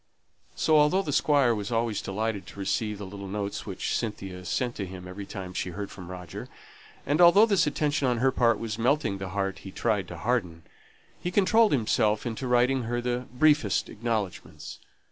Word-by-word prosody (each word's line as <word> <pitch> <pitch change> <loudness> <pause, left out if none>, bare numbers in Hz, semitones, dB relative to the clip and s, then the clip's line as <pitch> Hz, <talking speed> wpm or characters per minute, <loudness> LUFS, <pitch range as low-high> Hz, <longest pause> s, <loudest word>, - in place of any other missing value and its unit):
So 155 -1 +4
although 150 +7 +3
the 145 - -3
Squire 140 -5 +3
was 105 0 -4
always 115 -2 0
delighted 105 +1 -3
to - - -11
receive 105 +2 -1
the 100 - -7
little 100 +1 -8
notes 100 +1 -4
which 95 -2 -2
Cynthia 95 -5 -4
sent 120 +8 -2
him 95 -2 -6
every 95 +2 -8
time 95 -3 -7
she 90 - -2
heard 100 +3 -6
from 90 -3 -10
Roger, 90 -2 -8 0.6
and 145 +5 +2
although 175 +5 +8
this 200 -8 +2
attention 145 -1 0
on 125 -1 +1
her 130 +3 +3
part 115 -3 +3
was 110 -1 -5
melting 120 -5 +1
the 95 -1 -5
heart 95 0 -2
he 95 - -9
tried 100 -1 0
to 90 - -8
harden, 90 -8 -1 0.6
he 175 - -2
controlled 210 +4 +4
himself 110 -4 +1
into 120 +2 -3
writing 125 +2 +3
her 120 +1 -1
the 125 +1 -2
briefest 145 -5 +2
acknowledgments. 110 -4 -4
110 Hz, 185 wpm, -27 LUFS, 100-130 Hz, 0.6 s, although